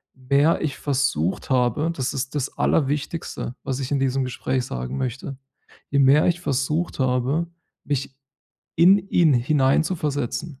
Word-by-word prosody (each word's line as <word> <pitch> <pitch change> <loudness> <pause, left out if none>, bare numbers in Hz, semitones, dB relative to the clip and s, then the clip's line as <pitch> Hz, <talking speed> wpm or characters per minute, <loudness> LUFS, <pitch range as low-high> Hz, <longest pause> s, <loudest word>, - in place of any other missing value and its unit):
mehr 140 +5 +2
ich 145 -4 -2
versucht 130 - -1
habe 130 +6 +1
das 135 -3 -3
ist 135 +2 -3
das 140 -2 -3
Allerwichtigste, 145 -2 -1
was 135 -1 -3
ich 135 0 -4
in 140 - +1
diesem 135 0 0
Gespräch 130 0 -2
sagen 60 - -5
möchte: 130 +1 -4 0.5
Je 140 - +2
mehr 140 +3 +5
ich 175 0 0
versucht 150 +3 -1
habe, 130 +5 +1 0.4
mich 135 -2 -3 0.6
in 185 +5 +6
ihn 160 -6 +4
hineinzuversetzen, 140 +1 0
135 Hz, 135 wpm, -23 LUFS, 130-150 Hz, 0.6 s, in